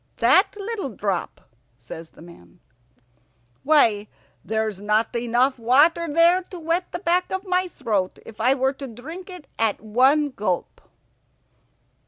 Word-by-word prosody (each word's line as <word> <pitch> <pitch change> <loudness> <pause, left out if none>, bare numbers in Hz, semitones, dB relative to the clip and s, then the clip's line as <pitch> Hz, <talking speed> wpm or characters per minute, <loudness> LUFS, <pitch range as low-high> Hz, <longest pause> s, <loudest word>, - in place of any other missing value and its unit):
"That 380 - +4
little 410 -5 -4
drop!" 200 -4 -3 0.4
says 160 +6 -10
the - - -16
man. 90 - -16 1.0
"Why, 225 -9 +3 0.4
there's 220 -2 -2
not 215 +3 0
enough 245 +3 +1
water 295 +8 +3
there 340 +4 +4
to 370 0 -11
wet 335 +3 -2
the - - -3
back 355 0 0
of 380 +1 -3
my 365 0 +1
throat 215 - -2
if 220 -1 -10
I 255 +4 +3
were 265 0 +1
to 275 0 -8
drink 310 - -9
it 360 -5 -10
at 225 -2 +1
one 265 +7 +2
gulp." 190 -7 -3
260 Hz, 140 wpm, -23 LUFS, 215-335 Hz, 1.0 s, That